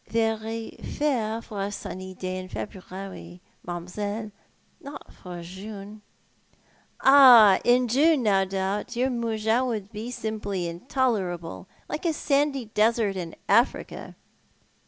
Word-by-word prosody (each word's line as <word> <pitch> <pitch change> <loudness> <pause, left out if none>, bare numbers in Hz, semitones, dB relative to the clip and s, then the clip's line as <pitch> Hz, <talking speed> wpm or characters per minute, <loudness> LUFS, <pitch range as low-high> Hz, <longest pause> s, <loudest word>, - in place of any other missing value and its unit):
" - - -37
Very 225 0 -2
fair 230 -6 -1
for 205 -2 -6
a 200 +1 -2
sunny 185 -2 -7
afternoon 185 0 -4
in 185 0 -6
February, 185 -2 -8 0.2
mam'selle, 205 +5 -5 0.5
not 285 -4 -10
for 175 -2 -9
June." 200 +3 -9 1.0
"Ah, 245 -8 +8
in 245 +1 +4
June, 285 +3 +3
no 195 -3 +3
doubt, 195 +4 -3
your 255 +2 +1
]\Iougins 230 +1 0
would 215 -4 -4
be 220 +2 -6
simply 210 -6 -3
intolerable, 175 - -2 0.2
like 325 - -3
a 325 - +1
sandy 280 -3 0
desert 215 -1 +1
in 170 -3 -5
Africa." - - +1
215 Hz, 120 wpm, -26 LUFS, 190-240 Hz, 1.0 s, Ah